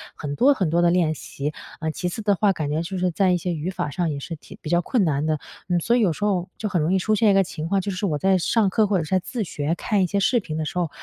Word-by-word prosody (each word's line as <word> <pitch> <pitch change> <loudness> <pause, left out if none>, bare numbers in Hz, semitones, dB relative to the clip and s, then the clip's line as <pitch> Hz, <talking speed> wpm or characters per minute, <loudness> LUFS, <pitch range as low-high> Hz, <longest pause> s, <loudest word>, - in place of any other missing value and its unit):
很 145 -2 -5
多 280 +3 +5
很 190 -10 0
多 170 +2 +2
地 175 - +4
练 170 -3 +2
习， 145 -1 -5 0.3
呃， 160 0 -1
其 180 - -3
次 180 +5 -4
的 205 -1 +2
话， 200 0 +3
感 155 -4 -3
觉 155 +2 0
就 185 +3 -4
是 180 -1 +1
在 185 +1 +2
一 180 - +2
些 175 +1 -2
语 160 +3 -3
法 180 -5 -3
上 175 +3 -1
也 145 - -3
是 165 - -6
挺 - - -14
比 - - -6
较 175 +1 +3
困 220 +3 +1
难 150 -2 0
的。 155 -1 +1 0.3
嗯， 175 - +1
所 235 +6 +2
以 - - +2
有 190 -7 +3
时 205 - -6
候 185 -4 +1
就 215 - -3
很 175 -4 +1
容 165 +5 +1
易 - - +4
出 215 +4 +1
现 215 0 +4
一 - - +4
个 195 0 +5
情 160 -2 -5
况， 195 +1 +1
就 200 +1 -3
是 185 +2 -2
我 150 -5 0
在 190 +3 +3
上 205 +3 +2
课 210 +2 +2
或 195 -2 +2
者 165 - 0
是 150 - -8
在 185 - +4
自 220 +4 -4
学 155 -2 -2
看 205 +2 0
一 - - +1
些 200 +3 0
视 240 +5 +3
频 155 -7 -6
的 160 - -1
时 155 - -5
候， 170 - 0
180 Hz, 360 characters per minute, -23 LUFS, 160-200 Hz, 0.3 s, 多